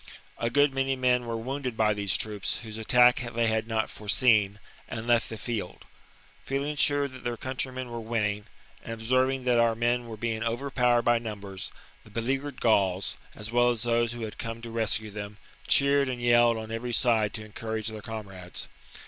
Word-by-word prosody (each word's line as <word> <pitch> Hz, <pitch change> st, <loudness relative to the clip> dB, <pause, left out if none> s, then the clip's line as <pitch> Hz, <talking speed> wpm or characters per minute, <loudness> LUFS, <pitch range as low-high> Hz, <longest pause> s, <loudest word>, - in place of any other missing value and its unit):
A 115 Hz, -, 0 dB
good 145 Hz, +1 st, +3 dB
many 135 Hz, 0 st, 0 dB
men 125 Hz, -1 st, +1 dB
were 115 Hz, -1 st, -2 dB
wounded 130 Hz, 0 st, -4 dB
by 110 Hz, -1 st, +3 dB
these 100 Hz, -5 st, +1 dB
troops, 105 Hz, -2 st, -1 dB
whose 110 Hz, -1 st, -7 dB
attack 125 Hz, +2 st, +5 dB, 0.2 s
they 115 Hz, 0 st, +2 dB
had 110 Hz, 0 st, 0 dB
not 110 Hz, -1 st, 0 dB
fore 105 Hz, -1 st, -9 dB
seen, 105 Hz, -2 st, +4 dB, 0.3 s
and 110 Hz, -1 st, -5 dB
left 120 Hz, -1 st, +2 dB
the 110 Hz, -, -6 dB
field. 110 Hz, -6 st, -5 dB, 0.6 s
Feeling 140 Hz, +2 st, -2 dB
sure 145 Hz, 0 st, +3 dB
that 130 Hz, -1 st, -12 dB
their 120 Hz, -1 st, -2 dB
countrymen 130 Hz, 0 st, -3 dB
were 120 Hz, -1 st, -5 dB
winning, 105 Hz, -2 st, -1 dB, 0.4 s
and 115 Hz, -, -5 dB
observing 130 Hz, +3 st, +1 dB
that 125 Hz, -1 st, +3 dB
our 115 Hz, -1 st, +3 dB
men 120 Hz, +1 st, 0 dB
were 110 Hz, -1 st, -7 dB
being 115 Hz, 0 st, -2 dB
overpowered 120 Hz, 0 st, +1 dB
by 120 Hz, -1 st, +3 dB
numbers, 100 Hz, -3 st, -6 dB, 0.3 s
the -, -, -16 dB
beleaguered 135 Hz, +6 st, -2 dB
Gauls, 95 Hz, -4 st, +2 dB, 0.2 s
as 105 Hz, +1 st, -7 dB
well 120 Hz, 0 st, +4 dB
as 120 Hz, -3 st, -1 dB
those 120 Hz, 0 st, +1 dB
who 120 Hz, -, -7 dB
had 110 Hz, -, -6 dB
come 115 Hz, 0 st, -5 dB
to 115 Hz, -, -6 dB
rescue 110 Hz, -1 st, 0 dB
them, 105 Hz, 0 st, -7 dB, 0.3 s
cheered 140 Hz, -1 st, +4 dB
and 125 Hz, -1 st, -3 dB
yelled 120 Hz, -1 st, +4 dB
on 110 Hz, 0 st, -6 dB
every 120 Hz, +2 st, -3 dB
side 110 Hz, -4 st, +2 dB
to 110 Hz, -, -6 dB
encourage 110 Hz, 0 st, -3 dB
their 110 Hz, -1 st, -7 dB
comrades. 100 Hz, -5 st, -7 dB
115 Hz, 190 wpm, -28 LUFS, 110-125 Hz, 0.6 s, attack